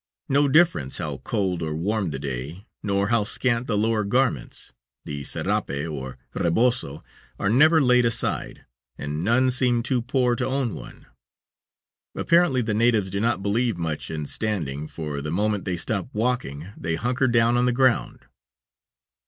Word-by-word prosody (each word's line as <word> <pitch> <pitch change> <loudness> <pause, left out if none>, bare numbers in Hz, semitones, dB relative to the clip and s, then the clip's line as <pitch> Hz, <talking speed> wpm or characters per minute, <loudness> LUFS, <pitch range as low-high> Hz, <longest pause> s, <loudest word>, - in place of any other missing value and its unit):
No 140 +1 +3
difference 150 - +3
how - - -3
cold 95 -4 -2
or 80 -1 -2
warm 100 +3 -1
the 70 - -4
day, 70 - -6 0.2
nor 100 -1 0
how 115 -2 +3
scant 120 +3 0
the 105 - 0
lower 110 0 +1
garments, 110 - -1 0.3
the 70 -1 -5
serape - - -1
and 70 -3 -4 0.2
rebozo 90 - +1 0.3
are 100 - 0
never 155 +7 +6
laid 125 -3 +4
aside, 115 -1 -1 0.3
and 75 +3 -4
none 130 +5 +3
seem 125 -2 +1
too 130 -1 0
poor 125 0 +1
to - - -1
own 130 -4 -1
one. - - -10 1.1
Apparently 170 -7 +3
the 110 -1 -1
natives 110 -3 +2
do 100 - -2
not 110 -3 0
believe 110 +1 0
much 80 -3 -3
in 75 -2 -4
standing, 75 -7 -3
for 75 -3 -5
the 75 - -4
moment 105 +4 0
they 90 -2 -2
stop 100 +4 -2
walking 105 - -2
they 80 0 -2
"hunker" 125 +6 0
down 115 0 +3
on 125 +1 +2
the - - +3
ground. 125 -1 +1
105 Hz, 160 wpm, -24 LUFS, 80-125 Hz, 1.1 s, never